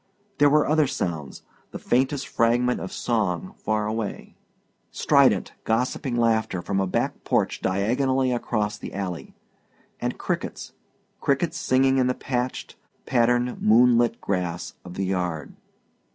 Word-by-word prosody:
There 145 0 +6
were 150 +1 +3
other 155 -1 +3
sounds; 80 - -4 0.3
the - - -7
faintest 135 +3 0
fragment 120 +2 +2
of 95 - -6
song 95 -7 -1
far 110 0 -1
away; 110 -1 -4 0.5
strident, - - +3
gossiping 125 +3 -1
laughter 110 -5 +1
from 100 -1 -1
a 95 - +1
back - - -2
porch - - 0
diagonally 130 +7 +1
across 105 -3 -1
the - - -8
alley; 95 -4 -5 0.6
and - - -3
crickets, - - -4 0.5
crickets 160 +4 0
singing 130 -2 +3
in 125 - +3
the 125 - 0
patched, 125 -1 -3 0.3
patterned, 120 0 +1
moonlit 120 +1 +4
grass 90 -3 -3
of 90 -1 -10
the 95 - -1
yard. 90 -4 -2
115 Hz, 130 wpm, -24 LUFS, 95-130 Hz, 0.6 s, There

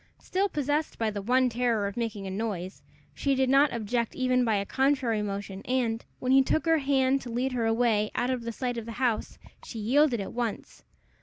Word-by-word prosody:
Still 390 +2 -1
possessed 295 0 -1
by 225 -1 0
the 205 -1 -4
one 255 +5 +3
terror 235 -3 0
of 200 - -4
making 220 -4 -3
a 190 - -4
noise, 190 -3 -4 0.3
she 275 -1 0
did 265 0 +2
not 280 +1 +5
object 235 0 -2
even 255 -1 +2
by 225 -3 +2
a 200 0 -1
contrary 265 -3 +1
motion, 200 -1 -5
and, 240 -3 -1
when 255 - -1
he 270 0 +7
took 315 +4 0
her 325 -1 +3
hand 270 -1 +2
to 245 - -8
lead 250 +3 -1
her 235 -3 0
away 225 -2 +2
out 245 +1 0
of 235 -2 -3
sight 245 0 -3
of 230 - -9
the 230 - -5
house, 240 -2 -1 0.3
she 230 - -8
yielded 250 +3 +3
at 195 - -5
once. 235 -3 -4
240 Hz, 210 wpm, -28 LUFS, 220-265 Hz, 0.3 s, he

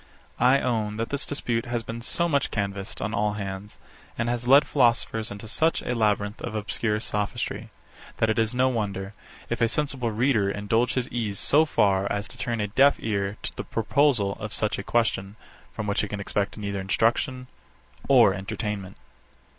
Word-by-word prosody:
I 125 +3 +5
own 110 -4 -1
that 115 +1 -3
this 140 0 -1
dispute 120 -5 -2
has 120 -1 -2
been 115 +1 -6
so 170 +8 +1
much 140 -4 +1
canvassed 100 -1 -3
on 110 - -2
all 105 0 +1
hands, 100 0 -6 0.4
and 115 +1 0
has 120 0 -2
led 140 +3 +7
philosophers 115 -4 +1
into 100 +2 -8
such 160 +9 +1
a - - -1
labyrinth 105 -2 0
of 115 -2 -5
obscure 105 0 0
sophistry, 110 +1 -3 0.5
that 110 - +2
it 110 +1 +1
is 110 -1 +2
no 125 +1 +2
wonder, 100 -4 -3 0.3
if - - -3
a 115 - +5
sensible 135 -2 -1
reader 110 -2 +2
indulge 110 +5 0
his 125 -1 0
ease 110 -4 -2
so 155 +9 +4
far 100 -9 +2
as 100 -2 -2
to - - -12
turn 115 -2 -1
a 105 - 0
deaf 135 +7 +5
ear 100 -1 -2
to - - -5
the - - -4
proposal 115 -3 +1
of 105 - -5
such 105 - 0
a - - -4
question, 105 -4 0 0.4
from 110 - -5
which 100 -1 0
he 105 - -2
can 105 0 -5
expect 100 +1 -2
neither 100 -2 -3
instruction 120 +6 0 0.6
or 120 -7 +7
entertainment. 100 -1 -4
110 Hz, 185 wpm, -26 LUFS, 100-120 Hz, 0.6 s, led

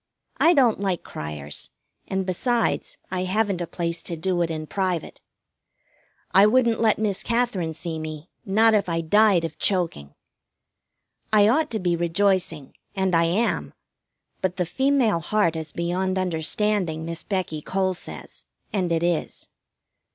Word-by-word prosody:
I 340 +2 +5
don't 245 -7 +4
like 190 -3 -1
cryers, 75 -1 -5 0.4
and, 190 0 -1
besides, 230 +6 0
I 185 0 -1
haven't 200 -1 0
a 175 - -3
place 170 0 -3
to 170 - -4
do 175 +2 0
it 170 - +1
in 155 -1 -4
private. 185 -1 -3 1.1
I 195 +2 +7
wouldn't 235 -1 +3
let 220 -2 +3
Miss 210 -3 -1
Katherine 230 -9 0
see 165 -1 -4
me, 155 +1 -7
not 220 +3 +4
if 205 -4 +2
I 165 0 0
died 195 0 +4
of 160 -1 -7
choking. 170 - -1 1.2
I 210 -1 +6
ought 300 +7 +2
to 220 - -2
be 175 -1 +1
rejoicing, 175 -3 0 0.2
and 190 -1 0
I 165 0 +4
am; 195 +8 0 0.7
but 185 -1 -1
the 180 -1 0
female 265 -3 +2
heart 170 0 +1
is 160 -1 -4
beyond 185 +2 -1
understanding, 180 -1 0
Miss 165 0 -4
Becky 185 -6 -3
Cole 190 +3 0
says, 175 - -8 0.3
and 185 -4 0
it 165 0 +1
is. 175 -2 -2
185 Hz, 150 wpm, -24 LUFS, 165-210 Hz, 1.2 s, I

